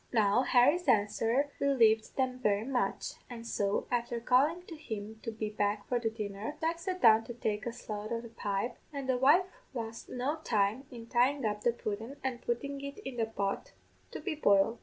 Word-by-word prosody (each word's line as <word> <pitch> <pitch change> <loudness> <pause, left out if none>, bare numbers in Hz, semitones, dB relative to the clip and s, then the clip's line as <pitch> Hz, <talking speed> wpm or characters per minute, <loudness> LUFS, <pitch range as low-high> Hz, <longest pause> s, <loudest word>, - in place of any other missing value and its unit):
"Now, 215 0 +4
Harry's 280 +8 +4
answer 225 +6 +2
relieved 225 -6 +3
them 255 -1 0
very 210 -2 +1
much, 260 -1 -1 0.2
and 230 -2 -8
so, 205 -3 0
afther 240 -1 0
calling 280 +9 +3
to 340 - -9
him 220 -6 -6
to - - -4
be 215 -1 -4
back 205 0 -1
for 245 - +1
the 230 -1 0
dinner, 215 +3 -5
Jack 330 +1 -1
sat 365 +2 -4
down 225 -1 +7
to 240 - -7
take 215 -1 -2
a - - -1
shough 215 -1 -6
o' 230 - 0
the 235 0 -9
pipe, 205 +1 -2
and 280 -3 -5
the 255 -1 +1
wife 295 +8 +6 0.3
lost 225 -1 -5
no 265 +5 -1
time 220 -3 0
in 235 -3 -9
tying 250 +3 +2
up 210 -1 -1
the 240 - +3
pudden 225 +3 -5
and 255 -2 -2
puttin' 280 +4 -3
it 280 0 -6
in 265 -2 -5
the 225 -1 +1
pot 200 -3 -3 0.4
to - - -6
be 370 - -2
boiled. 225 -5 +3
235 Hz, 200 wpm, -31 LUFS, 215-265 Hz, 0.4 s, down